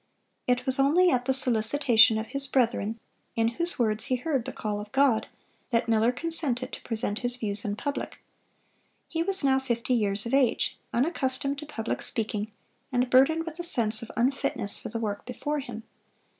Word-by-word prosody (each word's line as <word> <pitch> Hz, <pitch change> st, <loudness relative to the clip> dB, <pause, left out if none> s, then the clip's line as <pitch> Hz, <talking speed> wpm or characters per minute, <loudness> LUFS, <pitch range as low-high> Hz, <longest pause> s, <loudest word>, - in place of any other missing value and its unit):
It 250 Hz, 0 st, +1 dB
was 260 Hz, 0 st, +3 dB
only 335 Hz, +7 st, +4 dB
at 250 Hz, -1 st, 0 dB
the 265 Hz, -, +1 dB
solicitation 240 Hz, -2 st, +4 dB
of 220 Hz, -, -3 dB
his 275 Hz, 0 st, -1 dB
brethren, 230 Hz, -4 st, 0 dB, 0.4 s
in 225 Hz, 0 st, +2 dB
whose 340 Hz, +9 st, -3 dB
words 220 Hz, -3 st, +2 dB
he 255 Hz, -, 0 dB
heard 265 Hz, -2 st, -2 dB
the -, -, -5 dB
call 210 Hz, -1 st, -4 dB
of 210 Hz, 0 st, -11 dB
God, 270 Hz, -5 st, +2 dB, 0.4 s
that 235 Hz, -1 st, 0 dB
Miller 225 Hz, +1 st, +3 dB
consented 265 Hz, -3 st, -1 dB
to -, -, -7 dB
present 220 Hz, -2 st, +1 dB
his 245 Hz, 0 st, -1 dB
views 210 Hz, -4 st, -4 dB
in 205 Hz, -1 st, -3 dB
public. 285 Hz, +6 st, -4 dB, 0.9 s
He 330 Hz, -, -3 dB
was 390 Hz, 0 st, +3 dB
now 265 Hz, -1 st, +3 dB
fifty 250 Hz, -1 st, -2 dB
years 205 Hz, -3 st, 0 dB
of 235 Hz, -, -4 dB
age, 270 Hz, -4 st, +2 dB, 0.2 s
unaccustomed 275 Hz, 0 st, -1 dB
to 300 Hz, -, -9 dB
public 230 Hz, -6 st, -4 dB
speaking, 215 Hz, -1 st, -2 dB, 0.4 s
and 250 Hz, 0 st, 0 dB
burdened 315 Hz, +6 st, +4 dB
with 330 Hz, +1 st, -8 dB
a -, -, -2 dB
sense 225 Hz, -9 st, +3 dB
of 230 Hz, -, -8 dB
unfitness 245 Hz, -4 st, -1 dB
for -, -, -7 dB
the 230 Hz, -, -4 dB
work 210 Hz, -3 st, -4 dB
before 290 Hz, +4 st, -3 dB
him. 240 Hz, -5 st, -8 dB
250 Hz, 185 wpm, -27 LUFS, 225-275 Hz, 0.9 s, only